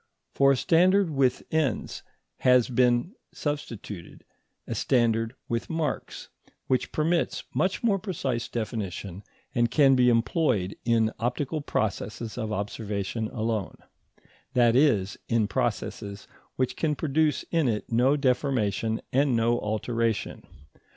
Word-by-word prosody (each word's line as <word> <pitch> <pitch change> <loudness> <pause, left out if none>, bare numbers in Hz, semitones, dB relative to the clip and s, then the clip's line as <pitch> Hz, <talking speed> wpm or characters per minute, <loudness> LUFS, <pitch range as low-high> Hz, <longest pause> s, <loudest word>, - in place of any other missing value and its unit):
For 140 0 +5
a - - -1
standard 180 +4 +3
with 135 -3 +1
ends 155 -8 -1 0.4
has 125 -1 +4
been 125 - +2 0.2
substituted 115 - -6 0.4
a - - -4
standard 115 -1 +1
with 115 0 -2
marks, 160 -4 -3 0.4
which 130 - 0
permits 165 +2 0
much 185 +4 0
more 205 -4 +2
precise 135 - -3
definition 100 -5 -4 0.3
and 120 -2 +2
can 140 0 +5
be 125 -1 +5
employed 115 - +1
in 115 -2 +3
optical 140 +6 -2
processes 110 -2 -3
of 110 -3 -3
observation 105 +1 -3
alone; 110 -3 -2 0.8
that 120 -2 +4
is, 110 -9 +2
in 115 -3 +2
processes 100 +1 -3 0.3
which 130 -1 -1
can 150 -2 0
produce 150 0 +1
in 165 -5 +2
it 110 -1 -2
no 125 +5 +4
deformation 120 -5 0
and 135 -1 +3
no 115 +1 +2
alteration. 115 +1 -2
120 Hz, 120 wpm, -27 LUFS, 110-145 Hz, 0.8 s, For